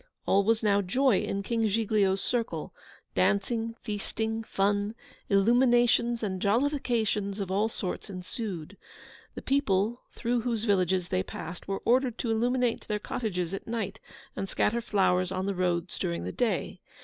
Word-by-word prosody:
All 200 +1 +4
was 225 +2 +2
now 205 -1 +4
joy 245 +4 +3
in 200 0 -2
King 225 +1 +1
Giglio's 205 -2 +2
circle. 240 -2 -2 0.4
Dancing, 225 +3 +1
feasting, 220 +1 -3
fun, 205 0 0 0.3
illuminations, 240 +2 +4
and 190 -3 -2
jollifications 220 -4 +1
of 195 -2 -3
all 205 +3 +2
sorts 200 -2 -4
ensued. 185 -1 -6 0.6
The - - -7
people 230 -4 +1
through 240 0 -1
whose 230 -2 -1
villages 185 -4 +2
they 90 - +1
passed 165 - -7
were 195 0 -3
ordered 245 -1 +3
to 230 - -1
illuminate 245 +1 +1
their 210 - 0
cottages 195 -5 -3
at 195 - -5
night, 220 -3 -3 0.4
and 195 - -3
scatter 235 +2 +1
flowers 185 -4 +2
on 185 0 -2
the 200 - 0
roads 180 -1 -1
during 85 0 -2
the 90 - -3
day. - - -1
210 Hz, 150 wpm, -29 LUFS, 195-230 Hz, 0.6 s, All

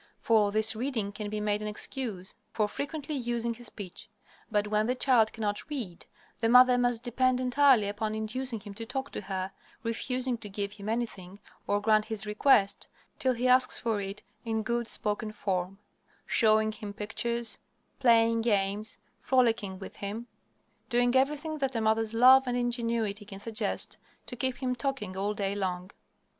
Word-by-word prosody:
For 215 -3 +3
this 220 +1 +3
reading 225 -4 -2
can 210 0 -5
be 215 0 -3
made 210 0 0
an 210 - -3
excuse 210 -3 -4 0.2
for 215 -2 +1
frequently 290 +6 -4
using 240 -3 -1
his 240 0 -8
speech. 190 -5 -9 0.4
But 210 -2 +1
when 215 +1 +1
the 250 - +1
child 245 -4 +4
cannot 210 +4 -3
read, 230 - -5 0.3
the 225 +1 +1
mother 250 +1 +7
must 245 -1 +1
depend 255 +1 +2
entirely 255 -3 +4
upon 215 +1 -2
inducing 225 +2 -3
him 205 0 -9
to 225 +3 -6
talk 265 +2 -4
to - - -4
her, 190 -1 -4 0.3
refusing 250 +1 -1
to 210 - -7
give 200 0 -3
him 205 0 -7
anything, 205 -5 -4 0.3
or 205 - +2
grant 215 0 +3
his 220 -2 -3
request, 210 -2 +3 0.3
till 260 -1 +2
he 245 +1 0
asks 255 0 +4
for 225 -3 -1
it 195 +2 -6 0.2
in 220 -2 -1
good 235 0 -1
spoken 210 0 -2
form; 190 -2 -2 0.5
showing 220 -1 +3
him 210 -2 -7
pictures, 230 +3 -3 0.4
playing 230 -3 +4
games, 205 -1 0 0.2
frolicking 230 -7 +1
with 190 - -10
him; 205 +4 -5 0.6
doing 245 0 +2
everything 300 +3 +1
that 270 -2 -1
a - - +1
mother's 220 0 +1
love 260 +3 +7
and 245 0 0
ingenuity 230 -4 -1
can 195 -1 -10
suggest, 215 -1 -1 0.3
to 250 - -7
keep 260 +2 -2
him 250 -1 +1
talking 245 -6 -3
all 200 +2 -1
day 200 -2 -1
long. 185 -1 -3
225 Hz, 170 wpm, -29 LUFS, 205-245 Hz, 0.6 s, mother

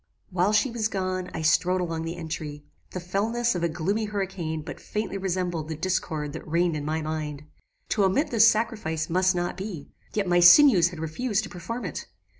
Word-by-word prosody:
"While 185 +2 +2
she 215 +4 +2
was 230 -2 0
gone, 185 -3 -3
I 160 - -4
strode 180 +4 +3
along 165 -2 -3
the 165 +1 -4
entry. 155 -3 -6 0.2
The 185 - -5
fellness 220 +7 0
of 175 - -3
a 170 - +1
gloomy 195 +7 -1
hurricane 190 -6 -3
but - - -8
faintly 210 -2 -4
resembled 175 -4 -2
the 160 - -3
discord 155 -3 -2
that - - -8
reigned 170 +1 +1
in 150 - -3
my 155 +1 -1
mind. 150 -2 -4 0.5
To 205 - +2
omit 200 +12 +1
this 230 -1 +6
sacrifice 215 -9 -1
must 185 +1 +3
not 175 0 -2
be; 190 -7 -7 0.2
yet 205 -2 +1
my 175 0 +4
sinews 175 - +8
had 175 - -10
refused 205 +7 -1
to 195 - -8
perform 230 +8 -5
it. - - -5
180 Hz, 195 wpm, -26 LUFS, 160-205 Hz, 0.5 s, sinews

